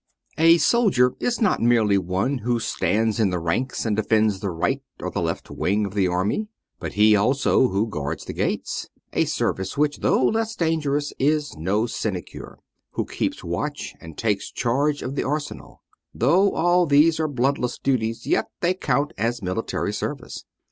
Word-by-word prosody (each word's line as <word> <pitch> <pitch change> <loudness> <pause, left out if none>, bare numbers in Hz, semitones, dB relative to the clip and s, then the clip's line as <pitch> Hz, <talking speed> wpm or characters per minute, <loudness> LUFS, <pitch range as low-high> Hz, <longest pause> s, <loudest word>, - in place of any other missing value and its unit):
A 165 +1 +7
soldier 160 - +3
is 245 -1 -1
not 210 -6 +2
merely 115 -4 +3
one 95 +9 -1
who 120 +1 0
stands 110 0 0
in 105 -3 +3
the 90 - -1
ranks 85 +13 -2
and 110 -2 +1
defends 110 -2 +2
the 100 -1 -3
right 110 +11 -1 0.2
or - - -4
the - - -2
left - - -3
wing 105 +3 0
of 100 - -6
the 100 -3 +2
army, 95 - -1 0.3
but - - -5
he 105 +1 +5
also 130 +4 +3
who 100 0 0
guards 75 -9 -4
the - - -6
gates - - -2
— - - -42
a - - +2
service 95 +4 -2
which, 145 0 +1
though 130 - +2
less 225 - 0
dangerous, 150 -3 0
is 150 +2 +1
no 95 +8 0
sinecure 100 -6 -5 0.2
— - - -54
who - - -1
keeps - - -3
watch, - - -4
and 80 -1 -11
takes 105 -3 -1
charge 140 +5 0
of 130 - -4
the - - -1
arsenal: 150 +2 -5 0.3
though 180 - +3
all 175 +1 +3
these 150 +3 +4
are 160 - +1
bloodless 130 -2 0
duties, 115 -4 -1
yet 110 - +1
they 175 +1 +2
count 145 -4 -1
as 115 0 -1
military 100 +2 -2
service. 135 +3 -5
120 Hz, 175 wpm, -23 LUFS, 105-150 Hz, 0.3 s, A